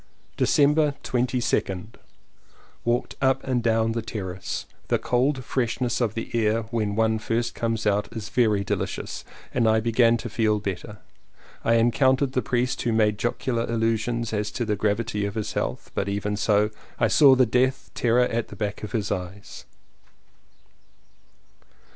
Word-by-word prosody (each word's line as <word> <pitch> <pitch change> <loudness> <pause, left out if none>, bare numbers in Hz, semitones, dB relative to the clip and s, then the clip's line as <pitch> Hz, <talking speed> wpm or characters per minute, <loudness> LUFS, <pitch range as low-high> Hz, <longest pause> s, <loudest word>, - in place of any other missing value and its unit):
December 150 0 +3
22nd. 120 -5 -1 0.9
Walked 120 +1 -1
up 135 0 +2
and 130 -2 0
down 115 -1 +2
the 115 0 -2
terrace. 95 -5 -5 0.2
The - - +2
cold 130 +2 0
freshness 125 -1 -1
of 110 -3 0
the 115 - -5
air 115 0 +1
when 105 -3 -1
one 110 0 +2
first 115 +2 -1
comes 115 -1 -2
out 105 -1 +1
is 110 -2 -6
very 110 -5 +2
delicious, - - -3 0.3
and 115 -3 +3
I 110 0 +4
begin 115 +1 +3
to 120 - -6
feel 110 -1 +1
better. 100 +1 -5 0.7
I 115 - +3
encountered 130 +3 +3
the 130 - 0
priest 125 +1 -1
who 120 - 0
made 105 -2 +2
jocular 120 0 -1
allusions 115 0 -1
as 105 0 -1
to 120 - -2
the 105 -1 0
gravity 105 0 -1
of 100 - -6
his 110 -2 -3
health, - - -3
but 100 - -1
even 100 +1 -2
so, 105 0 +2 0.3
I - - +3
saw 140 -3 +6
the 130 0 +4
death 125 +3 0
terror 120 +1 +3
at 115 -2 -2
the - - -10
back 105 -2 -3
of 105 - -7
his 110 -4 -1
eyes. 95 +3 -6
115 Hz, 155 wpm, -25 LUFS, 105-120 Hz, 0.9 s, saw